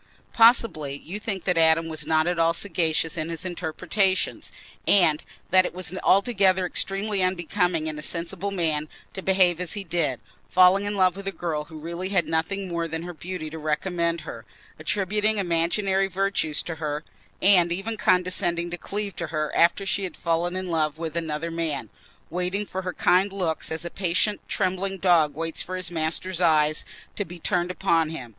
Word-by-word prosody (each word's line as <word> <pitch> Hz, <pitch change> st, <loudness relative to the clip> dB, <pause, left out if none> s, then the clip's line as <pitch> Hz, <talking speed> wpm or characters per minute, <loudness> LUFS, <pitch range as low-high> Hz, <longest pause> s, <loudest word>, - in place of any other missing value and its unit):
Possibly 225 Hz, -, +4 dB
you 185 Hz, +8 st, -7 dB
think 200 Hz, -3 st, -4 dB
that 180 Hz, -3 st, +1 dB
Adam 160 Hz, 0 st, +4 dB
was 160 Hz, -1 st, -5 dB
not 155 Hz, 0 st, +3 dB
at 175 Hz, -1 st, 0 dB
all 165 Hz, 0 st, +3 dB
sagacious 165 Hz, -3 st, 0 dB
in 155 Hz, 0 st, -2 dB
his 165 Hz, +1 st, -5 dB
interpretations, 185 Hz, +3 st, -1 dB, 0.4 s
and 165 Hz, -6 st, +4 dB, 0.3 s
that 185 Hz, 0 st, +6 dB
it -, -, -5 dB
was 185 Hz, 0 st, -1 dB
altogether 195 Hz, -3 st, +3 dB
extremely 195 Hz, +2 st, -1 dB
unbecoming 175 Hz, -2 st, 0 dB
in 155 Hz, -1 st, -4 dB
a -, -, -6 dB
sensible 175 Hz, +4 st, -1 dB
man 160 Hz, -5 st, -1 dB, 0.2 s
to 190 Hz, -, -5 dB
behave 185 Hz, -3 st, +3 dB
as 180 Hz, -, -2 dB
he 205 Hz, -2 st, -4 dB
did—falling 180 Hz, +4 st, +2 dB
in 205 Hz, 0 st, -2 dB
love 185 Hz, -2 st, +3 dB
with 195 Hz, 0 st, -8 dB
a -, -, 0 dB
girl 160 Hz, -5 st, -3 dB
who 160 Hz, 0 st, -11 dB
really 170 Hz, +4 st, -5 dB
had 190 Hz, -4 st, +2 dB
nothing 165 Hz, +5 st, -1 dB
more 170 Hz, -1 st, -2 dB
than 160 Hz, +1 st, -4 dB
her 175 Hz, 0 st, -6 dB
beauty 175 Hz, 0 st, -6 dB
to 160 Hz, -, -6 dB
recommend 170 Hz, +2 st, -1 dB
her, -, -, -8 dB, 0.4 s
attributing 210 Hz, +2 st, 0 dB
imaginary 190 Hz, +2 st, +1 dB
virtues 190 Hz, -5 st, -1 dB
to 165 Hz, -2 st, -5 dB
her, 150 Hz, 0 st, -2 dB, 0.4 s
and 180 Hz, -3 st, +5 dB
even 195 Hz, +6 st, -2 dB
condescending 180 Hz, -3 st, +1 dB
to 175 Hz, -, -5 dB
cleave 205 Hz, -1 st, -4 dB
to 170 Hz, -, -3 dB
her 155 Hz, -1 st, -2 dB
after 175 Hz, +4 st, +3 dB
she 195 Hz, 0 st, -1 dB
had 180 Hz, -4 st, -5 dB
fallen 170 Hz, +1 st, 0 dB
in 185 Hz, -1 st, -3 dB
love 155 Hz, -2 st, 0 dB
with 160 Hz, -1 st, -5 dB
another 165 Hz, 0 st, -3 dB
man, 165 Hz, -3 st, -3 dB, 0.4 s
waiting 180 Hz, +4 st, -2 dB
for 190 Hz, -1 st, -4 dB
her 180 Hz, -1 st, -4 dB
kind 185 Hz, +3 st, +3 dB
looks 175 Hz, -6 st, -2 dB
as 160 Hz, +2 st, -2 dB
a 170 Hz, -, -5 dB
patient 195 Hz, +3 st, 0 dB
trembling 190 Hz, 0 st, -1 dB
dog 165 Hz, -6 st, +3 dB
waits 165 Hz, +1 st, -2 dB
for 185 Hz, -, -5 dB
his 185 Hz, -1 st, -3 dB
master's 170 Hz, +2 st, -2 dB
eye 155 Hz, -3 st, +4 dB, 0.4 s
to 205 Hz, -, -1 dB
be 175 Hz, -1 st, -10 dB
turned 175 Hz, +1 st, 0 dB
upon 170 Hz, -4 st, +1 dB
him. 130 Hz, -7 st, -7 dB
175 Hz, 180 wpm, -25 LUFS, 160-190 Hz, 0.4 s, that